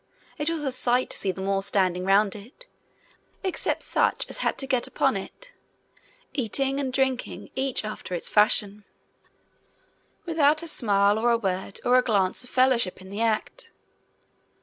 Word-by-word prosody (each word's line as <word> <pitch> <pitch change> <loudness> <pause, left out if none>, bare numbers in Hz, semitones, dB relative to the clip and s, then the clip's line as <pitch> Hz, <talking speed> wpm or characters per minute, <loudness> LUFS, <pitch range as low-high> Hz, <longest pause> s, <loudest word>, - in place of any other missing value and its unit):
It 295 +2 +1
was 330 -2 -2
a 270 - -1
sight 250 0 +1
to - - +1
see 190 - 0
them 190 +1 -6
all 195 0 +1
standing 185 -2 0
round 200 +1 +3
it 235 - -12 0.8
except 375 -2 -2
such - - +1
as - - -4
had - - 0
to 270 - -2
get 255 -2 0
upon - - +1
it - - -7 0.8
eating 270 +2 0
and 270 -2 -2
drinking, 265 -1 -2
each 265 -4 0
after 215 -4 -5
its 170 - -3
fashion, 210 -1 +3 1.4
without 310 -2 +2
a - - -6
smile, 205 -6 +2
or 240 +2 +2
a 235 - +4
word, 190 -2 -3
or 250 +1 +5
a - - +1
glance 200 0 +1
of 250 - -10
fellowship 255 -7 +2
in 190 +1 -12
the 205 +3 -4
act. 230 - -1
235 Hz, 165 wpm, -25 LUFS, 200-270 Hz, 1.4 s, or